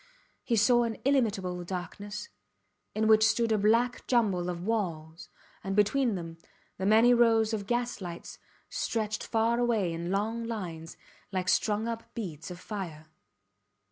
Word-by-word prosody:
He 235 - 0
saw 240 +3 +4
an 230 -2 -1
illimitable 200 -10 +1
darkness, 200 +4 -6 0.7
in 220 0 +1
which 220 0 +6
stood 225 +1 +2
a 215 - +3
black 230 +4 +2
jumble 200 -8 +2
of 175 -1 -4
walls, 175 -6 -3 0.3
and, 195 0 -2
between 220 +3 +2
them, 165 -2 -7 0.4
the 190 - 0
many 225 +3 +6
rows 225 -2 +4
of 200 -2 -3
gaslights 240 -8 -3 0.3
stretched 215 -1 -2
far 230 +1 +1
away 220 -8 +1
in 170 +1 -4
long 215 +4 -1
lines, 175 -8 -6 0.3
like 185 -1 -2
strung 210 +3 +1
up 230 -1 -6
beads 165 -8 -6
of 180 -1 -8
fire. 170 -7 -7
210 Hz, 140 wpm, -29 LUFS, 180-230 Hz, 0.7 s, which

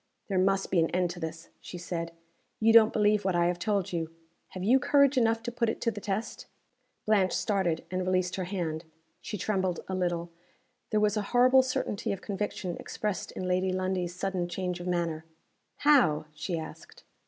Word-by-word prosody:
"There 190 -2 +1
must 195 +1 +1
be 180 - +3
an 165 - +2
end 180 -1 0
to 175 - -8
this," 160 0 -6
she 180 - -8
said. 170 -1 -4 0.5
"You 225 +1 +4
don't 225 -1 +8
believe 210 -1 +2
what 190 -2 0
I 170 0 +3
have 175 0 0
told 200 -1 -1
you. 165 -2 -2 0.4
Have 185 - -7
you 245 +7 +5
courage 280 +1 +4
enough 225 -2 +2
to 240 - -3
put 235 -1 0
it - - -3
to 230 - +1
the 205 -1 -8
test?" 200 +3 -4 0.6
Blanche 200 -4 +3
started, 190 -6 0
and 185 0 -1
released 185 -1 0
her 185 - -2
hand. 170 -4 -3 0.4
She 210 - -5
trembled 190 -2 -1
a 190 - -4
little. 175 -2 -1 0.6
There 215 - +2
was 210 0 +2
a - - +1 0.2
horrible 255 +2 +7
certainty 255 -5 -2
of 195 - -3
conviction 195 -3 -3
expressed 210 -3 -4
in 185 - -4
Lady 185 +1 +1
Lundie's 185 -1 -2
sudden 185 -2 -2
change 180 0 -3
of 175 - -6
manner. 170 -3 -1 0.5
"How?" 260 - +4
she 165 +3 -3
asked. 160 -1 -9
185 Hz, 190 wpm, -29 LUFS, 175-210 Hz, 0.6 s, don't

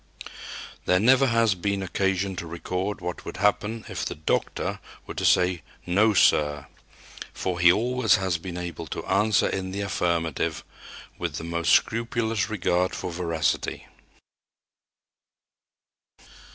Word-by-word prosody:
There 90 - +3
never 130 +5 +5
has 115 -3 +3
been 100 +2 -2
occasion 95 0 -1
to 85 - -5
record 90 +4 -3
what 90 -1 -5
would - - -7
happen 105 +3 0
if - - -4
the - - -3
"doctor" 75 - -1 0.3
were - - -7
to - - -4
say, 90 -2 +3 0.2
"No, 105 +4 +3
sir." 75 -5 +3 0.7
For 90 -2 -3
he 90 +1 +7
always 120 +1 +2
has 95 -3 -1
been 90 0 -6
able 85 -2 -5
to - - -5
answer 105 -2 +2
in 95 -1 -3
the 100 +2 -4
affirmative, 85 -5 -1 0.6
with - - -3
the - - -5
most 85 0 0
scrupulous 115 -3 +1
regard 90 -3 0
for - - -4
veracity. 85 -3 -1
95 Hz, 130 wpm, -25 LUFS, 85-105 Hz, 0.7 s, he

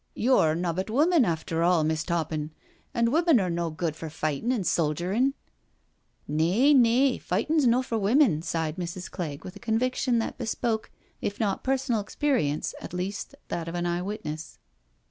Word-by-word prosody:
Yo're 215 -10 +3
nobbut 175 +3 -2
women 300 +4 +4
after 165 -1 -2
all^ 170 -1 +3
Miss' 160 0 0
Toppin, 160 -3 -2 0.4
and 235 +1 +1
women 330 -5 +4
are 185 -3 0
no 170 0 -1
good 160 0 -3
for 160 0 -6
fightin' 155 - -2
and 225 -8 -1
soldierin\" 180 - +1 0.5
" - - -43
Nay, 225 - +4
nay, 255 +1 +4
fightin 230 - 0
*s 295 - +4
no 245 +2 +4
for 230 -3 -2
women," 210 - +3
sighed 160 -1 -2
Mrs. 175 0 -5
Clegg 155 -6 -5
with 185 - -8
a - - -10
conviction 240 +3 0
that 225 - -3
bespoke 220 0 -2 0.3
if 205 - -3
not 200 -3 -1
personal 260 -4 0
experience 200 - -1
at - - -8
least 190 +3 -4
that 170 -1 -3
of 165 - -5
an 175 0 -1
eye 175 0 0
witness. 180 -6 -6
190 Hz, 170 wpm, -27 LUFS, 165-240 Hz, 0.5 s, women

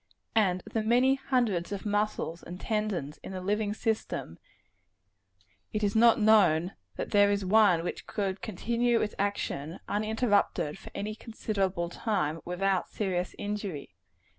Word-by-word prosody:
And 185 -5 +2
of - - -12
the 225 - +1
many 245 +4 +4
hundreds 240 -10 0
of 200 +1 -4
muscles 205 -5 -1
and 180 +1 -8
tendons 210 -10 -2
in - - -8
the 185 - -4
living 205 +3 0
system, 220 - -2 1.3
it 215 - -1
is 205 0 +1
not 230 +1 +6
known 190 -5 +4 0.2
that - - -4
there 205 0 +5
is 200 -1 0
one 190 -4 +5
which 175 - -5
could 195 -2 -2
continue 235 +3 0
its 210 - -1
action, 185 -5 -2
uninterruptedly, 210 -7 +1
for - - -11
any 210 +2 -3
considerable 195 -6 -2
time, 175 -6 -1
without 185 +1 0
serious 185 -4 -2
injury. 205 - -4
205 Hz, 140 wpm, -29 LUFS, 180-220 Hz, 1.3 s, not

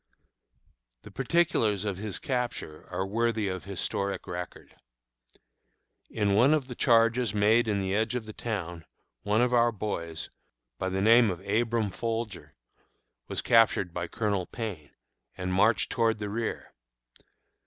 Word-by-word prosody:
The - - -12
particulars 130 - +1
of 100 -3 -2
his 105 0 -4
capture 125 - -4
are 95 +1 -2
worthy 110 +1 0
of 95 -1 -4
historic 100 0 -2
record. 90 0 -7 1.3
In 105 -2 0
one 125 +9 +5
of 140 -4 -2
the 125 - -6
charges 115 -2 +3
made 110 +3 +4
in 105 -2 +1
the 95 0 -1
edge 110 +4 0
of 120 -3 -3
the 110 - -8
town, 85 -9 -5 0.4
one 105 +3 +1
of 125 0 +1
our 120 0 +4
boys, 85 -7 -4 0.5
by 95 - -1
the 95 +1 -1
name 115 +1 +6
of 95 +1 -6
Abram 110 0 +1
Folger, 115 +1 -4 0.7
was - - -3
captured 110 -6 +3
by 85 -1 -3
Colonel 100 -2 -1
Payne, 95 - -6 0.5
and 90 0 -3
marched 105 +5 +3
toward 115 -2 +2
the 105 -1 -4
rear. 115 +1 -4
105 Hz, 145 wpm, -28 LUFS, 95-115 Hz, 1.3 s, name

